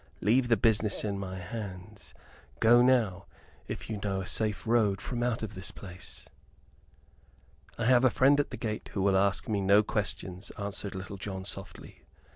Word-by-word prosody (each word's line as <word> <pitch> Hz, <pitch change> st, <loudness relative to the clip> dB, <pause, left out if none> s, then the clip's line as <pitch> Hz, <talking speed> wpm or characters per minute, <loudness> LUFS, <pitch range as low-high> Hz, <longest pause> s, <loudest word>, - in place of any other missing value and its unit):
"Leave 120 Hz, +5 st, +3 dB
the 115 Hz, -2 st, +4 dB
business 110 Hz, 0 st, +2 dB
in 100 Hz, -2 st, -2 dB
my 95 Hz, -1 st, -5 dB
hands. 100 Hz, 0 st, -8 dB, 0.4 s
Go 120 Hz, +2 st, +6 dB
now, 115 Hz, -8 st, +2 dB, 0.4 s
if -, -, -6 dB
you 110 Hz, -2 st, -4 dB
know 100 Hz, -2 st, -1 dB
a -, -, -5 dB
safe 105 Hz, +2 st, -1 dB
road 110 Hz, -4 st, +2 dB
from 120 Hz, +2 st, -4 dB
out 120 Hz, -2 st, 0 dB
of 110 Hz, -, -5 dB
this 95 Hz, +1 st, -5 dB
place." 90 Hz, -3 st, -10 dB, 1.5 s
"I -, -, -1 dB
have 125 Hz, 0 st, +5 dB
a 130 Hz, -, +6 dB
friend 140 Hz, +4 st, +4 dB
at 145 Hz, -, 0 dB
the -, -, -6 dB
gate 110 Hz, -2 st, -4 dB
who 95 Hz, -, -1 dB
will 100 Hz, -1 st, +3 dB
ask 95 Hz, -3 st, +2 dB
me 105 Hz, -2 st, 0 dB
no 100 Hz, +2 st, +5 dB
questions," 100 Hz, -2 st, -3 dB
answered 100 Hz, -1 st, -4 dB
Little 95 Hz, +1 st, -6 dB
John, 95 Hz, -1 st, -6 dB
softly. 95 Hz, -2 st, -8 dB
100 Hz, 175 wpm, -29 LUFS, 95-115 Hz, 1.5 s, Go